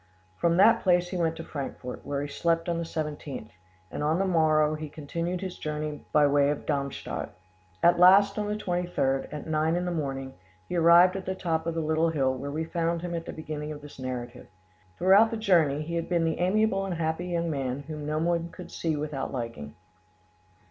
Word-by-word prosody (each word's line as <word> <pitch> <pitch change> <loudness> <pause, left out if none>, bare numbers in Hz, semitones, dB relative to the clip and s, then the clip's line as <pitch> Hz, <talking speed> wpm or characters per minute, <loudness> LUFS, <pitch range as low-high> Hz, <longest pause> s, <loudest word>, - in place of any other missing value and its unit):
From 170 - +1
that 225 +4 +6
place 180 -1 +3
he 185 - -3
went 165 -1 0
to 165 - -7
Frankfort, 135 -4 -6
where 140 0 -2
he - - -4
slept 165 +3 0
on 170 -1 0
the - - -2
17th, 150 -7 -5 0.4
and - - -4
on 155 +2 +1
the 195 - +1
morrow 155 -4 +3
he 155 0 -5
continued 170 +5 -4
his 185 -2 -6
journey 150 -1 -4
by 150 -1 +5
way 145 0 +3
of 145 - -3
Darmstadt. 140 -2 -3 0.5
At 175 0 +5
last, 200 +3 +6
on 210 - -1
the 210 - -1
23rd, 175 -9 -1
at 150 -1 -6
nine 160 +1 +1
in 180 +1 -1
the 180 - -1
morning, 135 -5 -3 0.3
he - - -4
arrived 170 +2 +6
at 195 - -5
the 190 - -1
top 165 -3 -2
of 165 - -2
the 165 - 0
little 160 +1 +1
hill 135 -5 +1
where 135 +2 -5
we 155 +3 -2
found 165 0 -1
him 175 -1 -4
at 165 -1 -4
the - - -4
beginning 155 -1 -6
of 145 -1 -8
this 145 -2 -12
narrative. 125 -1 -6 0.5
Throughout 195 +5 +6
the 225 - -3
journey 165 -9 +3
he 165 +2 -6
had 170 -1 -2
been 170 -2 +2
the 160 - -1
amiable 195 +2 +2
and 190 -2 -3
happy 160 +2 -2
young 170 -1 -1
man 135 -2 -2
whom 150 0 -7
no 155 0 -1
one 170 +1 0
could 180 - -11
see 160 -2 -1
without 150 -2 -3
liking. 115 - -6
160 Hz, 210 wpm, -27 LUFS, 145-175 Hz, 0.5 s, that